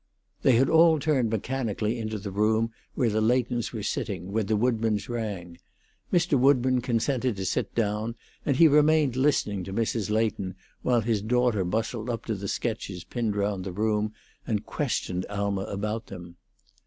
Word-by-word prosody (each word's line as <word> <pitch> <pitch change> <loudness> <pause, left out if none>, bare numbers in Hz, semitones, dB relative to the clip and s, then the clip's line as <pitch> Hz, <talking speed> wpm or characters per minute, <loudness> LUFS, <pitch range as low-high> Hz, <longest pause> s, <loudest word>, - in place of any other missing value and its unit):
They 135 - +5
had 125 +3 +4
all 160 0 +6
turned 140 -6 +1
mechanically 115 0 -2
into 110 -1 -3
the 100 0 -6
room 110 +3 +1 0.2
where 120 -5 +2
the 110 +1 +1
Leightons 120 +1 +1
were 110 -4 -5
sitting 95 -3 -3
when 110 -1 0
the 110 0 +2
Woodburns 110 -2 +1
rang: 100 -8 -5 0.5
Mr. 175 -6 +3
Woodburn 130 -1 +4
consented 125 0 0
to 95 -1 -4
sit - - -2
down, 110 +1 -1 0.3
and 140 -4 +1
he 165 - +8
remained 150 -2 +4
listening 130 -8 +1
to 95 - -7
Mrs. 110 -1 -1
Leighton 105 -4 0 0.3
while 120 -2 +2
his 110 -2 0
daughter 120 -2 +2
bustled 110 +5 -2
up 115 -1 -3
to 115 - -1
the 100 -1 -5
sketches 100 -6 -3
pinned 115 -4 -2
round 100 -2 -1
the 95 - -4
room 105 +2 0 0.4
and 105 -2 -1
questioned 95 - -2
Alma 100 -1 -2
about 105 +2 -3
them. 85 -2 -10
110 Hz, 165 wpm, -27 LUFS, 100-125 Hz, 0.5 s, he